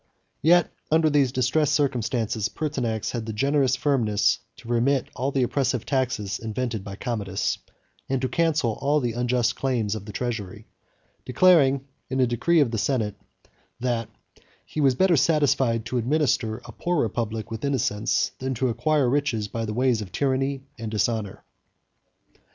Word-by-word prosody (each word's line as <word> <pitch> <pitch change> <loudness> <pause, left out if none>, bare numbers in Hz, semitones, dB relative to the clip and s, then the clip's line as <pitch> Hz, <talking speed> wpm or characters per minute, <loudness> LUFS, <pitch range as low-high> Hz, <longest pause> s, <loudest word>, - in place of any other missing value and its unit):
Yet 175 +2 +4 0.2
under 160 0 +3
these 140 -4 +3
distressed 130 +4 +1
circumstances, 120 -5 0
Pertinax 125 -8 -2
had 115 -2 -4
the 110 - -3
generous 135 +3 +2
firmness 110 -8 +2 0.2
to 115 - -14
remit 125 +3 +1
all 130 +3 -1
the 135 -2 +1
oppressive 125 -2 0
taxes 120 -8 -1
invented 115 -1 -3
by 100 0 -7
Commodus, 100 -4 -2 0.5
and 135 -1 +1
to 130 - 0
cancel 155 -8 0
all 145 +2 +2
the 120 -4 -1
unjust 120 0 +1
claims 120 -6 -1
of 105 -2 -6
the 105 - -7
treasury; 110 -3 -4 0.6
declaring, 140 -3 +4 0.2
in 130 0 -1
a 130 - +5
decree 150 +8 +2
of 130 -5 +2
the 115 - -1
senate, 115 -5 0 0.7
"that 120 -2 -1 0.6
he 155 - -4
was 135 -3 +4
better 185 +3 +4
satisfied 135 -7 +2
to 125 +1 -1
administer 125 -3 0
a - - -9
poor 175 -2 -1
republic 110 -1 -2
with 110 0 -5
innocence, 120 -6 0
than 130 0 -2
to 130 +2 0
acquire 130 +4 +1
riches 125 -5 0
by 115 +2 -3
the 105 - -4
ways 125 -2 +2
of 95 -4 -7
tyranny 135 +1 0 0.2
and 115 -1 -4
dishonor." 105 -1 -1
125 Hz, 155 wpm, -25 LUFS, 110-140 Hz, 0.7 s, a